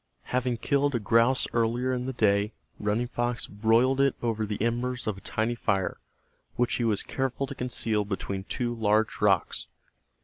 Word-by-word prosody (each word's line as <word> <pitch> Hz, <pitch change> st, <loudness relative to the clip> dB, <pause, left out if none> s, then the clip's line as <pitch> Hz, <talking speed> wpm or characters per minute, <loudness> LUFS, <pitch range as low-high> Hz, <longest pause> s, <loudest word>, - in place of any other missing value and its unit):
Having 125 Hz, -1 st, +1 dB
killed 140 Hz, +2 st, +1 dB
a -, -, +2 dB
grouse 115 Hz, +4 st, +3 dB
earlier 120 Hz, +2 st, +1 dB
in 125 Hz, 0 st, -2 dB
the 130 Hz, -, -2 dB
day, 105 Hz, -2 st, +2 dB, 0.3 s
Running 105 Hz, +3 st, 0 dB
Fox 120 Hz, -1 st, -2 dB
broiled 115 Hz, +6 st, +2 dB
it 140 Hz, -1 st, +3 dB
over 110 Hz, -2 st, 0 dB
the 105 Hz, -1 st, -3 dB
embers 120 Hz, +2 st, -1 dB
of 110 Hz, -, -1 dB
a 100 Hz, -, -12 dB
tiny 110 Hz, +2 st, -1 dB
fire, 95 Hz, -5 st, -1 dB, 0.6 s
which 120 Hz, 0 st, +1 dB
he 120 Hz, -, -1 dB
was 110 Hz, -3 st, +1 dB
careful 135 Hz, 0 st, -2 dB
to 140 Hz, -, -7 dB
conceal 115 Hz, -4 st, -1 dB
between 95 Hz, -1 st, -4 dB
two 120 Hz, +1 st, -2 dB
large 110 Hz, -1 st, +1 dB
rocks. 100 Hz, -5 st, +2 dB
115 Hz, 170 wpm, -27 LUFS, 105-125 Hz, 0.6 s, grouse